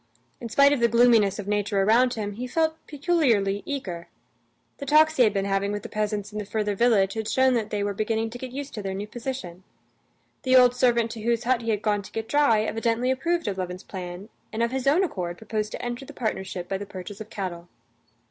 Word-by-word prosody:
In 235 - -6
spite 280 +4 +5
of 285 - 0
the 235 - +4
gloominess 230 -4 +4
of 205 -2 -6
nature 205 -1 0
around 245 +5 +4
him, 210 -2 -3
he 245 +5 -5
felt 315 +4 +1
peculiarly 265 - +1
eager. 185 -12 -4 0.7
The 280 - -6
talks 310 +2 +5
he 255 - +6
had 215 - +4
been 195 -1 -1
having 200 0 0
with 205 0 -4
the - - -7
peasants 210 -1 -2
in 210 - -3
the 210 - -4
further 210 0 -1
village 200 -3 +3
had 220 -1 -3
shown 260 0 +3
that 225 -3 -1
they 205 -1 -1
were 205 0 -1
beginning 220 +2 -1
to 245 - -8
get 255 -1 -6
used 280 +2 -6
to 210 - -5
their 195 -1 -4
new 200 +2 -4
position. 210 -6 -6 0.8
The 260 0 +3
old 250 -1 +7
servant 235 -2 +2
to 225 -2 -7
whose 235 +1 0
hut 250 0 +1
he 230 - -4
had 210 -2 0
gone 210 -1 +1
to 195 - -13
get 225 0 -4
dry 260 -8 +3
evidently 230 +3 0
approved 335 +5 -1
of 195 -2 -2
Levin's 180 +1 -5
plan, 185 +2 -7 0.2
and 225 +1 -1
of 235 - 0
his 265 0 -2
own 315 +8 +4
accord 175 - -3
proposed 215 0 -3
to - - -5
enter 240 +2 -4
the - - -11
partnership 190 -6 -3
by 195 +1 -2
the 205 - -7
purchase 195 +1 -8
of 215 - -8
cattle. 175 -5 -5
220 Hz, 235 wpm, -25 LUFS, 200-250 Hz, 0.8 s, old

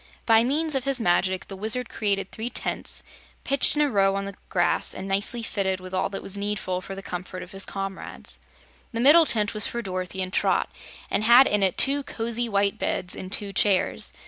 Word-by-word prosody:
By 225 -1 +5
means 305 +5 0
of 270 -1 -1
his 275 -2 0
magic 185 -1 +1
the 195 - -8
Wizard 220 +5 0
created 200 -4 -2
three 225 +2 -5
tents, - - -2 0.4
pitched 275 +1 +2
in 300 - +3
a 290 - +1
row 195 -2 +2
on 195 0 -3
the 200 - -6 0.2
grass 175 -1 +1
and 190 - -6
nicely 205 +4 0
fitted 190 -3 -1
with 185 0 -10
all 185 - 0
that 195 - -6
was 195 - -3
needful 200 -2 -3
for 195 +1 -8
the 195 - -9
comfort 185 +1 -6
of 180 - -13
his 195 0 -1
comrades. 195 -1 -6 0.5
The 230 - -3
middle 300 +6 +6
tent 210 -2 +3
was 215 -1 +3
for 235 0 -4
Dorothy 185 -1 -4
and 185 0 -7
Trot, - - +1 0.4
and - - 0
had 240 +4 +7
in 210 -4 +1
it 190 -2 +2
two 280 +1 +5
cosy 235 -2 -3
white 200 -1 +1
beds 180 - -2
and 185 - -7
two 200 -1 -1
chairs. 195 0 +2
200 Hz, 210 wpm, -25 LUFS, 190-235 Hz, 0.5 s, had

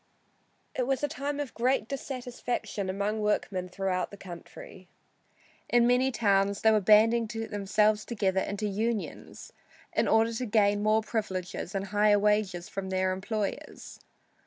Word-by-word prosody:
It 250 -1 -1
was 270 +1 0
a - - +3
time 290 -1 -4
of 285 -4 -4
great 245 -2 +1
dissatisfaction 245 -6 -4
among 200 +3 -1
workmen 195 -3 -1
throughout 185 0 -2
the 200 - -11
country. 195 - -11 0.8
In 240 -1 +4
many 250 +2 +3
towns 200 -3 +1
they 220 - +5
were 215 -1 +3
banding 220 +3 +5
themselves 215 -1 0
together 195 -5 0
into 205 +2 -3
"unions" 215 +2 -3 0.4
in - - +1
order 225 +1 +3
to 250 +3 -3
gain 205 -1 +3
more 215 +1 +3
privileges 195 -4 -4
and 195 0 -1
higher 205 0 +4
wages 205 -3 +1
from 195 -2 -5
their 185 0 +1
employers. 205 +2 -5
210 Hz, 140 wpm, -28 LUFS, 195-230 Hz, 0.8 s, they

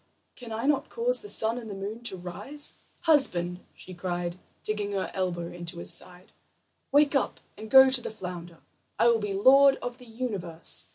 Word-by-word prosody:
can 240 -2 -11
I 225 +3 -3
not 290 -1 +1
cause - - -1
the 415 - -11
sun 225 - +4
and 225 -2 -9
the 200 - -6
moon 205 +4 -6
to 190 - -4
rise? 260 +12 -2 0.3
Husband!" 180 - +2 0.2
she 185 - -12
cried, 175 0 -4 0.2
digging 210 -1 -3
her 195 -1 -3
elbow 175 -3 -3
into 175 0 -5
his 170 - 0
side, 180 0 -4 0.6
"wake 290 +1 +4
up 275 - -1 0.2
and 220 0 -10
go 265 +1 +8
to 260 -1 +7
the - - -5
flounder. 175 -5 -9 0.4
I 235 - +4
will 230 -1 +3
be 210 -2 -3
lord 270 +6 +6
of 245 0 -7
the 250 - -14
universe." 200 -9 -2
215 Hz, 185 wpm, -27 LUFS, 180-260 Hz, 0.6 s, go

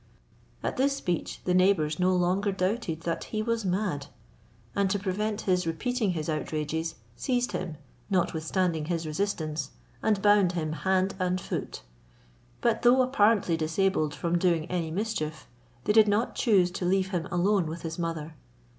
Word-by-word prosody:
At - - -2
this 275 +2 +2
speech 175 - -3
the 180 - +1
neighbours 180 -5 +3
no 185 +1 +3
longer 185 +3 +1
doubted 185 -3 -1
that 165 0 -3
he 215 -1 -2
was 230 0 -1
mad: 185 -6 -1 0.7
and 200 -1 +2
to 205 - +1
prevent 210 +2 -2
his 180 -3 +1
repeating 215 +4 0
his 155 -3 -3
outrages, 155 +1 -2 0.2
seized 245 -2 0
him, 170 -4 -4 0.3
notwithstanding 170 -2 0
his 165 0 -2
resistance, 155 -3 -2 0.3
and 215 -2 +2
bound 205 -3 +4
him 155 -3 -2
hand 190 +4 +1
and 185 0 0
foot, - - -5 0.8
But 230 -1 +2
though 250 +2 +6
apparently 220 -8 +3
disabled 160 -1 0
from 170 0 0
doing 170 -3 +2
any 170 -3 -1
mischief, 160 -5 -3 0.4
they 210 - +2
did 220 -1 +7
not 210 +4 +1
choose 190 -7 +3
to 180 0 -4
leave 190 +1 +2
him 180 -2 -2
alone 185 0 +2
with 160 +1 -6
his 165 +1 -5
mother. 165 -2 -3
185 Hz, 155 wpm, -28 LUFS, 165-205 Hz, 0.8 s, did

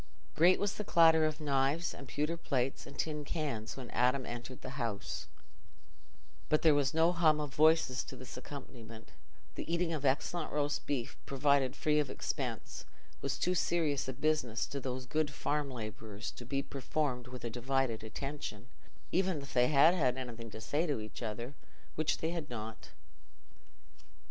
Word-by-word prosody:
Great 175 +3 +6
was 205 0 +1
the 210 - -4
clatter 160 -4 +6
of 155 0 -3
knives 145 +3 +1
and 140 - -9
pewter 150 +5 -1
plates 135 -5 -1
and 140 - -11
tin 150 -2 -1
cans 140 -8 -3
when 130 -2 -7
Adam 125 +2 +2
entered 120 +1 -7
the 130 +1 -5
house, 110 -4 -3 1.2
but 155 - +3
there 160 -2 +7
was 140 -1 +3
no 165 +2 +4
hum 160 -3 +4
of 145 -2 -3
voices 155 -4 +4
to - - -9
this 130 -1 -9
accompaniment: 120 -4 -9 0.4
the - - -5
eating 170 0 +1
of 150 -3 -3
excellent 145 +5 +1
roast 145 0 -1
beef, 130 -5 -2
provided 140 -1 +3
free 150 -1 +2
of 145 -3 0
expense, - - -3 0.4
was - - -1
too 180 - +1
serious 160 -6 +1
a 130 - -2
business 135 -4 0
to 140 - -4
those 130 -1 -4
good 155 +4 0
farm 145 0 -1
labourers 110 -3 -6
to 120 - -10
be 140 +1 0
performed 135 -2 -2
with 125 0 -8
a 120 - -3
divided 125 -1 0
attention, 125 -1 -5 0.4
even 185 -3 +2
if 140 -1 -9
they 125 0 +5
had 155 +4 +6
had 130 -8 +2
anything 120 -3 -6
to 110 - -8
say 145 +9 0
to 145 -6 0
each 110 +2 -8
other—which 120 +7 -4
they 160 - -1
had 165 -4 -4
not. 110 -2 -6
140 Hz, 170 wpm, -33 LUFS, 125-155 Hz, 1.2 s, there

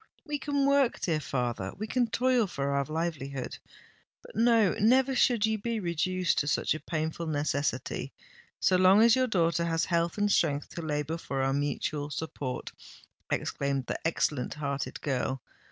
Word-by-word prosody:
"We 295 -2 -3
can 285 0 0
work, 280 -3 +3
dear 160 -4 0
father—we 125 - -3
can 245 +2 +1
toil 245 -1 +2
for 140 -5 -2
our 140 0 +1
livelihood! 150 -4 -4 0.6
But, - - -14
no—never 230 +3 +4
should 240 -4 +3
you 220 0 0
be 230 +2 -2
reduced 180 0 0
to 145 - -1
such - - +1
a 155 - -5
painful 160 +1 -3
necessity, 145 -4 -1 0.5
so 185 - +3
long 185 +4 +6
as 235 +1 +6
your 255 0 +2
daughter 170 -5 +1
has 165 -1 0
health 170 +1 0
and 205 0 +2
strength 145 -6 +1
to 170 - -6
labour 150 +1 -2
for 135 -4 -2
our 135 0 +1
mutual 145 +1 -2
support!" 145 -4 -5 0.6
exclaimed 140 -2 -1
the - - -3
excellent 150 -4 0
hearted 140 -2 -3
girl. 130 -1 -1
165 Hz, 155 wpm, -29 LUFS, 145-220 Hz, 0.6 s, long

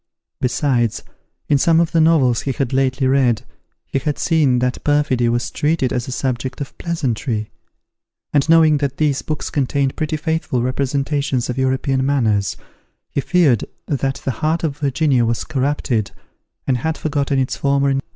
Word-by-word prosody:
Besides, 125 -3 0 0.4
in 145 - +3
some 165 +3 +4
of 170 -2 +1
the 165 -1 +3
novels 145 -8 +3
he 135 - -2
had 135 0 -2
lately 135 0 +1
read, 130 -4 +2 0.4
he 135 - -2
had 145 +2 -2
seen 150 -7 +2
that 125 0 -1
perfidy 145 -5 +2
was 120 0 -1
treated 150 -4 0
as 125 -1 -2
a - - -5
subject 130 0 -3
of 140 - -6
pleasantry; 125 -9 -2 0.8
and 145 +1 +2
knowing 160 -2 +6
that 140 -1 -2
these 150 -3 +1
books 155 -1 -4
contained 140 -1 0
pretty 155 0 -2
faithful 160 -6 -1
representations 135 0 -1
of 125 - -6
European 130 0 +1
manners, 115 -8 +1 0.5
he 140 - -1
feared 150 - +3 0.2
that 135 -2 -1
the 135 - +1
heart 155 +7 -1
of 150 -3 -2
Virginia 140 -2 +2
was 115 0 0
corrupted, 135 -6 -1 0.6
and 130 - +1
had 160 +6 -2
forgotten 145 -2 -1
its 130 -1 0
former 140 0 +1
engagements. 135 0 -1
135 Hz, 160 wpm, -19 LUFS, 125-150 Hz, 0.8 s, knowing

